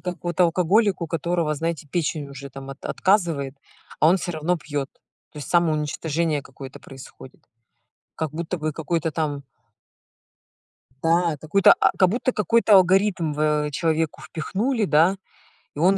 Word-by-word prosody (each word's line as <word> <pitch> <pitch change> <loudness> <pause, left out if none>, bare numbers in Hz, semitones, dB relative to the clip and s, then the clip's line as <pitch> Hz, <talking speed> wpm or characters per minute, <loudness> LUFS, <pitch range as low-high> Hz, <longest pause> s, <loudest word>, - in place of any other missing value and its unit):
как 180 -1 -4
вот 175 +1 -3
алкоголик, 180 +3 +3
у - - -2
которого, 165 0 -1
знаете, 160 0 -3
печень 150 -2 -2
уже 140 0 -9
там 135 0 -9
от 135 - -11
отказывает, 165 -9 0 0.5
а 155 - +6
он 180 - +5
всё 175 -1 -4
равно 165 +3 -1
пьёт. 145 -3 -4 0.4
То - - -10
есть 145 - -7
самоуничтожение 160 -1 0
какое-то 135 -1 -11
происходит. 135 -1 -13 0.7
Как 160 -3 -3
будто 170 +3 -4
бы 155 0 -2
какой-то 160 +1 -2
там 150 -2 -3 1.6
Да, 165 -1 +2
какой-то 180 +5 +5
а, - - +5
как 185 -2 +4
будто 250 +5 -1
какой-то 215 +1 +3
алгоритм 185 -3 +3
в 150 0 0
человеку 160 +1 -1
впихнули, 215 - -2
да, 170 +3 +3 0.6
и - - -6
он 185 +4 +4
165 Hz, 145 wpm, -23 LUFS, 150-180 Hz, 1.6 s, а